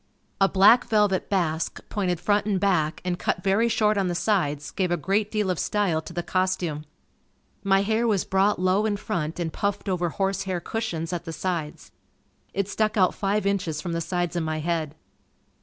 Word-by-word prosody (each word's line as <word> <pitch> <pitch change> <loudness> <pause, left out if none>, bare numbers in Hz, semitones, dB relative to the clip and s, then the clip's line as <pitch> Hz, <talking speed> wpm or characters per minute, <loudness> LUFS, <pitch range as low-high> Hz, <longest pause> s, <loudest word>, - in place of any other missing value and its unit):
A 195 - +5
black 205 +5 +6
velvet 210 -3 +1
basque 170 -5 -1
pointed 180 -5 -1
front 205 +3 +1
and 200 -3 +1
back, 175 -6 +1
and 180 -1 -1
cut 180 - -1
very 200 +4 +2
short 210 -2 +2
on 190 - +1
the 175 - -1
sides 150 -8 0
gave 185 -3 -1
a 175 - +1
great 200 +6 0
deal 210 -3 0
of 180 - -3
style 195 -7 0
to 160 - -10
the 175 0 -3
costume. 185 -5 -1 0.8
My 195 0 +3
hair 220 +3 +1
was 205 -5 +1
brought 195 +2 +2
low 185 +4 +2
in 205 -1 -1
front 170 -6 -3
and 165 -2 -2
puffed 200 0 -2
over 180 -2 0
horsehair 195 0 -1
cushions 175 -5 -3
at 170 -1 -4
the 165 - -5
sides. 165 -4 -4 0.6
It 200 -1 -1
stuck 215 +1 0
out 185 -2 +4
five 200 0 -1
inches 185 -6 -1
from 175 +2 -4
the 165 - -1
sides 175 0 -2
of 175 - 0
my 155 0 -2
head. 155 -1 -2
185 Hz, 190 wpm, -25 LUFS, 170-205 Hz, 0.8 s, black